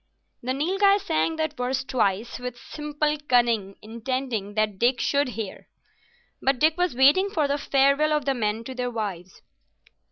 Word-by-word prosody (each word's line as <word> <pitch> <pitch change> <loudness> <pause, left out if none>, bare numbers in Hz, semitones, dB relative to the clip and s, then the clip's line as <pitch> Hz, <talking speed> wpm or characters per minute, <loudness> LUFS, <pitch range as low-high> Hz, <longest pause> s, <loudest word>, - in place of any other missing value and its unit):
The 255 +2 -2
Nilghai 390 +7 +3
sang 325 -4 -1
that 315 -1 -2
verse 255 0 -2
twice, 225 -3 -1
with 250 -1 -6
simple 300 +2 -3
cunning, 230 -6 +2
intending 225 -2 -4
that 215 -3 0
Dick 245 +1 +2
should 285 0 +1
hear. 215 -4 -6 0.7
But 270 0 +2
Dick 310 +4 +3
was 355 -6 0
waiting 290 +10 +5
for 310 -7 0
the 285 +1 -1
farewell 280 +3 +3
of 300 -3 0
the 275 - +2
men 220 -2 -2
to 260 - -7
their 250 -1 -2
wives. 195 -6 -6
260 Hz, 160 wpm, -25 LUFS, 230-300 Hz, 0.7 s, waiting